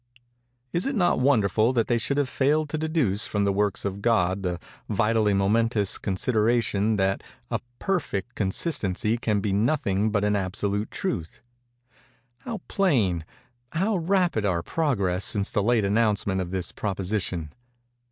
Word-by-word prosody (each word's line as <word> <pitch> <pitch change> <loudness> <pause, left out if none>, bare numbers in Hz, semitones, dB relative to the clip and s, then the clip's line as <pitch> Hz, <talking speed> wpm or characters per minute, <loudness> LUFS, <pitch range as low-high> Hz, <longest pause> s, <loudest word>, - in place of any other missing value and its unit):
Is 170 +7 +1
it 275 - -1
not 180 -5 +2
wonderful 115 -3 +3
that 115 -3 +2
they 120 -1 +1
should 140 +5 -1
have 145 -2 +2
failed 150 +4 +1
to 155 - -2
deduce 150 - 0
from 105 -1 0
the 100 - +2
works 100 0 0
of 100 0 -3
God 100 -4 +2
the 90 -2 -2 0.3
vitally 105 -1 +2
momentous 105 +1 +1
consideration 110 +1 +1
that 95 -1 +1 0.3
a - - 0 0.2
perfect 145 - -2
consistency 105 - -1
can 105 -4 0
be 100 -1 -1
nothing 105 -2 +1
but 105 -1 +1
an 105 0 +2
absolute 100 +2 -1
truth? 90 - -4 1.0
How 230 -6 -6
plain—how 120 - -1
rapid 175 - +1
our 90 -4 0
progress 100 - 0
since 100 -2 0
the 105 - +1
late 110 0 +2
announcement 100 -2 +1
of 90 - -4
this 90 -2 -3
proposition! 95 -5 -3
105 Hz, 140 wpm, -25 LUFS, 100-125 Hz, 1.0 s, wonderful